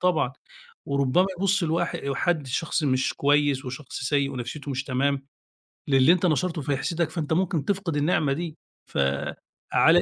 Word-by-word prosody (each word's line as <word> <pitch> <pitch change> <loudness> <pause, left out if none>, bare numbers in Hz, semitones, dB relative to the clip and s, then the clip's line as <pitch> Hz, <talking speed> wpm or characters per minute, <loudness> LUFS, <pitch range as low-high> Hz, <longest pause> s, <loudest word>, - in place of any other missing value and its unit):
طبعًا، 175 -8 +2 0.5
وربما 140 +6 +2
يبص 195 0 +2
الواح 165 +1 0 0.2
حد 160 -4 0
شخص 155 +5 -1
مش 130 -3 +1
كويس، 145 -1 +2
وشخص 130 +3 -6
سيء 140 +1 +1
ونفسيته 135 +3 -5
مش 130 0 -2
تمام 135 +1 0 0.6
للي 135 +2 +5
أنت 180 0 +1
نشرته 165 0 +1
فيحسدك، 155 +4 -1
فأنت 160 -1 -2
ممكن 170 -4 0
تفقد 190 -6 -1
النعمة 150 -1 +2
دي، 160 +1 -5 1.1
فَعلى 170 +2 +6
150 Hz, 140 wpm, -25 LUFS, 135-170 Hz, 1.1 s, فَعلى